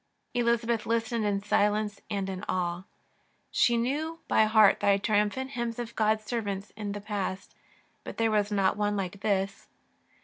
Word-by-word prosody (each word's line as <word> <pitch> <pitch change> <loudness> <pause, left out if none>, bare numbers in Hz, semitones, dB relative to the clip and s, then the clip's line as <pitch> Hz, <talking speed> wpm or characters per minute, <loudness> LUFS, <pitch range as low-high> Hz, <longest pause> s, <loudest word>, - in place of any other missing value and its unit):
Elizabeth 235 -2 +1
listened 230 -1 0
in 200 -1 0
silence 210 0 +1
and 200 -2 -2
in 190 0 -5
awe. 175 0 -1 0.7
She 240 -1 +3
knew 295 +7 -1
by 220 - +4
heart 215 -2 +5
the 200 -1 +4
triumphant 210 +6 0
hymns 235 -2 -3
of 235 -1 -6
God's 215 0 +2
servants 205 -4 -3
in 205 -1 -5
the 205 - -6
past, 200 -2 -4 0.5
but - - -8
there 225 -1 +2
was 210 -1 +1
not 195 -2 +2
one 205 0 0
like 195 0 -4
this. 195 -1 -1
210 Hz, 160 wpm, -28 LUFS, 200-230 Hz, 0.7 s, heart